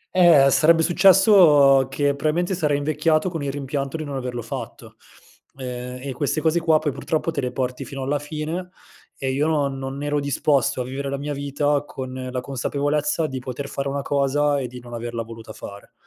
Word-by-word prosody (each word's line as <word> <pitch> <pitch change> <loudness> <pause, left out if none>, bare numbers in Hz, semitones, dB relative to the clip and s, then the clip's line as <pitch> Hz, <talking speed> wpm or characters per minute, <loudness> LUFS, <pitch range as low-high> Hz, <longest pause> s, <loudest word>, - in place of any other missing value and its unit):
Ehm, 165 -7 +7
sarebbe 165 +2 +4
successo 170 - +6
che 140 +1 +1
probabilmente 160 +6 0
sarei 150 -5 +1
invecchiato 155 +4 +1
con 165 -3 -4
il 140 -1 -2
rimpianto 140 +1 -3
di 155 - -4
non 145 -2 -6
averlo 125 -2 -4
fatto, - - -8 0.6
ehm, 125 -1 -6
e 140 -1 -4
queste 145 +4 -1
cose 160 +2 +2
qua, 165 -2 +3
poi 155 -1 -1
purtroppo 155 +4 -2
te 145 - -2
le 125 -1 -2
porti 125 0 -3
fino 135 -1 -6
alla 145 +2 0
fine, 155 +5 -5 0.5
e 135 -1 -2
io 140 +3 +1
non 140 -4 0
non 135 +1 -5
ero 145 0 0
disposto 140 -2 +1
a - - -1
vivere 135 +2 -5
la 140 - -2
mia 145 +1 -4
vita 145 +1 0
con 130 -3 -7 0.2
la 125 0 -3
consapevolezza 145 +4 -1
di 135 -3 -4
poter 130 +2 -6
fare 140 0 -4
una 140 0 -3
cosa 145 +1 +1
e 130 - -3
di 125 +1 -10
non 120 0 -12
averla 115 0 -4
voluta 115 -1 -10
fare. 100 -1 -11
140 Hz, 195 wpm, -22 LUFS, 130-155 Hz, 0.6 s, Ehm